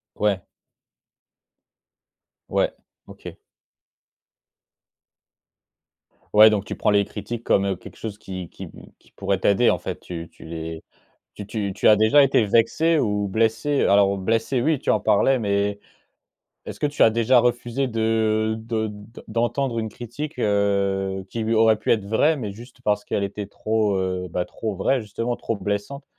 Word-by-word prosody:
Ouais. 100 -3 0 2.1
Ouais. - - +1 0.3
OK. - - -11 3.0
Ouais, 110 +1 +9
donc 105 -2 -1
tu - - -4
prends - - +1
les 100 0 +3
critiques 115 +2 -6
comme, 100 - +2
heu, 95 -2 -1
quelque - - -13
chose 105 -2 -7
qui 95 -4 -7
qui - - -9
p - - -14 0.2
qui - - -27
pourrait 100 -1 -1
t'aider 100 +5 +3
en - - 0
fait. - - -5
Tu 85 -2 -7
tu - - -16
les, 80 0 -6 0.5
tu 105 - -7
tu 100 -2 -3
tu 105 - +1
as 105 - +6
déjà 110 +7 +5
été 125 -5 +3
vexé 160 +10 +2
ou 105 -6 0
blessé? 115 +7 +1
Alors, 100 0 +4
blessé 115 +5 0
oui 150 0 +1
tu - - -4
en - - +3
parlais, 135 -1 +3
mais 100 -1 -1 0.9
est-ce - - -8
que - - 0
tu 145 0 -2
as - - +8
déjà 115 +3 +3
refusé 120 +2 0
de 110 -1 0
de 110 -1 -2
d 105 +2 -12
d'entendre 120 +2 -1
une 110 - -3
critique, 130 +8 -7
heu, 100 -2 0
qui, 115 -1 -3
oui, 115 - 0
aurait 110 0 +4
pu - - 0
être 105 -4 +1
vraie, 145 +9 +2
mais 105 -6 -4
juste 120 +4 -14
parce 105 -2 +1
qu'elle 100 - -2
était 100 0 -5
trop, 110 -1 0
heu, 95 -1 -2
bah 90 +1 -2
trop 110 -3 -5
vraie, 120 +7 +1
justement, 115 +3 -3
trop 115 - -3
blessante? 105 +8 -4
110 Hz, 165 wpm, -23 LUFS, 100-115 Hz, 3.0 s, Ouais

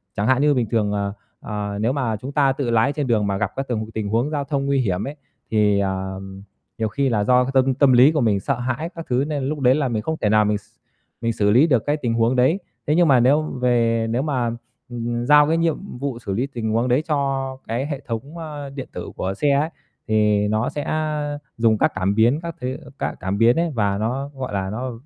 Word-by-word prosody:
Chẳng 105 +2 0
hạn 130 +1 +3
như 145 0 +4
bình 120 -4 0
thường, 105 -3 +1
ờ, 100 -1 -2 0.3
ờ, 105 -1 -4
nếu 120 +4 +1
mà 120 -6 -1
chúng 130 +6 -7
ta 140 -2 +3
tự 135 -3 -2
lái 115 +5 +3
trên 145 -4 -2
đường 105 -3 +2
mà 100 -1 -1
gặp 105 0 -1
các 135 0 -3
từng 110 -2 -3
tình 110 -2 -3
huống 120 +6 +1
giao 145 -2 -1
thông 140 0 -2
nguy 140 -1 +1
hiểm 100 -2 -1
ấy, 145 - -6 0.4
thì 105 -2 +3
à, 95 -1 -2 0.6
nhiều 110 -1 0
khi 135 +4 0
là 105 -3 +1
do 125 +3 +4
cái 135 - -3
tâm 130 0 +3
tâm 135 -1 +4
lý 130 +5 +7
của 150 -4 0
mình 105 -4 +2
sợ 135 +3 -2
hãi 130 +7 -2
các 165 - -7
thứ, 125 +2 +2
nên 145 -3 -2
lúc 145 +2 -2
đấy 130 0 +4
là 145 -3 0
mình 110 -2 -1
không 160 0 -2
thể 105 - +2
nào 105 0 +4
mình 105 0 +1
x - - -24 0.6
mình 115 -1 0
xử 105 -1 +2
lý 135 +9 +5
được 125 -7 +2
cái 145 +1 +1
tình 120 -5 -1
huống 115 +2 +2
đấy. 130 +10 +3 0.3
Thế 150 - +3
nhưng 175 -1 +4
mà 130 -3 +5
nếu 140 +6 +4
về 120 -5 +1
nếu 120 +3 0
mà, 130 -6 -1 0.4
ừm, 120 0 -3
giao 150 +1 +6
cái 165 +1 +2
nhiệm 165 -2 -2
vụ 135 -4 -3
xử 100 -4 -4
lý 125 +7 -1
tình 115 -5 -3
huống 115 +3 +1
đấy 130 +5 +2
cho 135 -3 -1
cái 120 +5 -2
hệ 140 -3 -4
thống, 130 +8 -6
ơ, 150 -3 -6
điện 135 -1 -7
tử - - -6
của 95 +1 -2
xe 145 +6 +1
ấy, 145 +4 +2 0.4
thì 105 -1 +2
nó 110 +2 0
sẽ, 145 - -4
ơ, 150 -2 -2 0.2
dùng 115 -2 +3
các - - +2
cảm 95 +2 0
biến, 120 +7 +3
các 170 -1 -5
thứ 130 +2 -3 0.2
các - - -2
cảm 95 +2 -2
biến 115 +2 +5
ấy 170 -2 0
và 100 -2 +1
nó, 130 +6 -2
gọi 130 -5 -5
là, 95 -1 -2
nó 125 +4 -4
125 Hz, 255 wpm, -22 LUFS, 110-140 Hz, 0.6 s, lý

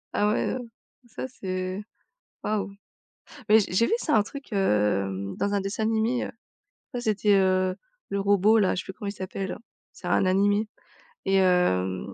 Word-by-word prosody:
Ah 210 - +3
ouais, - - 0
heu, 255 - -3 0.5
ça 250 - -6
c'est, 185 -4 -4 0.6
waouh! 210 -2 -1 0.8
Mais 220 +1 +8
j'ai 200 - -3
j'ai 230 +5 +4
vu - - -2
ça, 305 - +1
un 210 - +5
truc, 275 +6 -10
hem, 100 - +1
dans 200 - -1
un 200 - +1
dessin 195 +3 -3
animé, 225 +3 +1
heu. - - -5 0.6
Ouais, 245 - -3
c'était, 210 -2 +2
heu, 185 -1 +3 0.3
le 200 - -1
robot-là, 200 +1 +4
je - - -2
sais - - -16
plus 190 - -7
comment 200 +1 -5
il - - -2
s'appelle. 190 -1 -5 0.3
C'est - - -13
un 180 +2 +2
animé. 205 +3 +2 0.6
Et 195 - +2
hem 100 - +2
195 Hz, 175 wpm, -26 LUFS, 185-215 Hz, 0.8 s, Mais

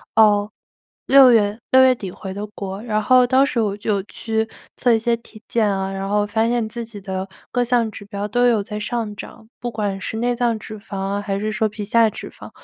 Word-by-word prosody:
哦， 210 -2 +5 0.6
6 270 -1 +8
月 210 -1 +3
6 260 0 +8
月 260 - +6
底 200 -5 -7
回 190 +1 -8
的 205 +1 -4
国， 195 -2 -6
然 215 -2 -1
后 255 +3 +5
当 260 +2 +4
时 255 -4 0
我 205 -2 0
就 205 -1 -1
去 220 +1 -2 0.3
测 245 - +3
一 225 - +4
些 235 +1 +1
体 225 -1 -16
检 225 -3 +2
啊， 195 -1 -1
然 195 0 -4
后 205 +1 +2
发 220 +2 0
现 235 -2 0
自 235 +2 -6
己 220 -3 -10
的 190 0 -4 0.2
各 245 -1 +1
项 240 -2 +1
指 205 - -10
标 205 0 -5
都 245 +4 +2
有 230 -4 +3
在 210 +1 -6
上 220 -1 -3
涨， 220 +2 -11
不 245 - -3
管 205 -3 -2
是 220 - -4
内 245 +1 0
脏 235 -1 +1
脂 215 0 -9
肪 205 -1 -9
啊， 195 +1 -2
还 200 -1 -3
是 215 +1 -1
说 215 0 0
皮 210 0 -6
下 225 +2 +4
脂 - - -8
肪， - - -12
215 Hz, 240 characters per minute, -21 LUFS, 205-235 Hz, 0.6 s, 6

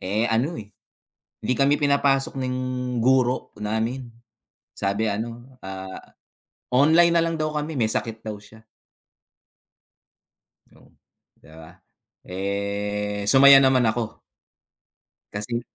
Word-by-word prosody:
eh, 105 +5 -1
ano 120 +7 -1
eh, 105 - -12 0.7
hindi 125 - -1
kami 140 +1 +2
pinapasok 140 -2 +1
ng 130 -1 -2 0.4
guro 130 +1 +1
namin. 115 +4 -3 0.7
Sabi, 100 +3 -1
ano, 120 +5 -6
ah, 95 0 -7 0.7
online 160 +7 +4
na 165 - +3
lang 165 -1 -2
daw 155 - 0
kami, 150 -3 -3
may 110 - +2
sakit 115 0 -2
daw 110 -1 -6
siya. 105 +2 -16 2.1
Oh, - - -21 0.5
'di - - -21
ba? 80 0 -12 0.5
Eh, 100 +2 -3
sumaya 135 +2 +8
naman 130 -2 +4
ako. 110 0 -4 1.1
Kasi 115 +3 -3
120 Hz, 110 wpm, -23 LUFS, 105-135 Hz, 2.1 s, sumaya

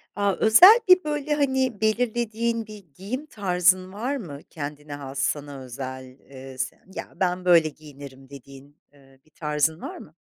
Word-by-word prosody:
A, 200 -1 +1
özel 365 - +8
bir 365 0 +6
böyle, 295 0 -2
hani, 265 -6 0
belirlediğin 230 0 -1
bir 210 -2 -11
giyim 240 - -5
tarzın 185 - +1
var 245 +7 -3
mı? 165 - -7
Kendine 150 -1 -7
has 140 -1 -7
sana 145 +1 -2
özel, 130 0 -8 0.2
ııı, 130 0 -10
s 130 +1 -4 0.2
ya, - - -7
ben 180 -1 -1
böyle 170 -3 +5
giyinirim 140 -3 -13
dediğin, 140 +1 -14 0.2
ııı, 135 -2 -22
bir - - -27
tarzın 150 +2 -1
var - - -7
mı? 155 - -14
170 Hz, 155 wpm, -24 LUFS, 140-225 Hz, 0.2 s, özel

